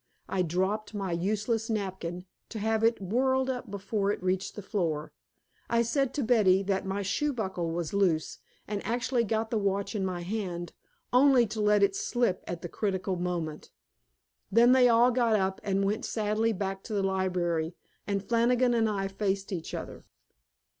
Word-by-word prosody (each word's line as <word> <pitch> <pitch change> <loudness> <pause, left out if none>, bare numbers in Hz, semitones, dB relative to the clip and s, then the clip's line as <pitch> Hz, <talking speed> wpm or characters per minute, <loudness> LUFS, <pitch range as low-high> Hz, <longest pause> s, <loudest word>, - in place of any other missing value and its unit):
I 190 - 0
dropped 190 +6 -1
my 195 -3 -2
useless 215 +6 -1
napkin, 190 -4 -3 0.2
to - - -6
have 220 +1 0
it 230 +1 +3
whirled 260 +7 +1
up 250 -1 -6
before 200 0 -2
it 205 - -4
reached 185 +1 -1
the 205 - -7
floor. 165 -7 -2 0.6
I 235 0 +3
said 265 +3 0
to 290 - 0
Betty 205 -5 +4
that 195 0 -1
my 200 +1 -2
shoe 295 +9 0
buckle 190 -8 -3
was 165 0 -3
loose, 180 -6 +1 0.3
and 205 -1 -3
actually 240 +2 0
got 220 +1 -1
the 225 - +1
watch 200 0 -1
in 205 -3 -1
my 180 -2 -2
hand, 175 -3 -4 0.4
only 255 -1 +6
to 215 0 -4
let 210 -1 +4
it 195 -1 +3
slip 235 -3 0
at 170 -1 -5
the - - -3
critical 190 0 -2
moment. 175 -3 -3 0.8
Then 235 +4 +6
they 255 -1 +6
all 235 +2 +5
got 235 -3 +2
up 190 -2 0
and 195 0 +1
went 210 +3 -1
sadly 215 +1 0
back 195 -1 -3
to 220 - -5
the 200 - +1
library, 180 -3 0 0.3
and 200 -1 -2
Flannigan 240 +1 +3
and 225 -2 +2
I 195 -2 -1
faced 195 0 -2
each 170 -3 -4
other. - - -7
200 Hz, 175 wpm, -29 LUFS, 185-230 Hz, 0.8 s, only